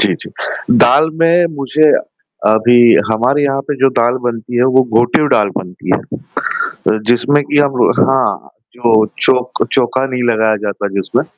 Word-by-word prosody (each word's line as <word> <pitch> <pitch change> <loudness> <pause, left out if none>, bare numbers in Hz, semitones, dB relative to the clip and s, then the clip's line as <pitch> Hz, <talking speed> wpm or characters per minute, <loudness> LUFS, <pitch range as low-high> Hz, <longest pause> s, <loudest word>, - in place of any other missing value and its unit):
जी, - - +2
जी। - - -11 0.5
दाल 160 +2 +3
में 170 +1 +3
मुझे, 150 +3 +2 0.6
अभी 120 +2 +4 0.2
हमारे 125 +6 +1
यहाँ 135 -1 0
पे 145 - -1
जो 135 +1 +2
दाल 120 +2 +1
बनती 120 +1 -4
है, 120 - +3
वो 130 0 +3 0.2
घोटिव 120 +5 +1
दाल 105 - +2
बनती 90 -1 -8 0.8
है। 110 - -3
जिसमे 120 +5 +2
की 145 - +2
हम 140 -4 +2
हाँ, 135 -1 0 0.3
जो 115 -3 +2
चौक 125 0 0
चौका 130 +1 0
नहीं 125 -2 -4
लगाया 110 -1 +1
जाता 100 0 -4
है 95 - -5
जिसमें। 95 -2 -1
125 Hz, 160 wpm, -14 LUFS, 115-135 Hz, 0.8 s, अभी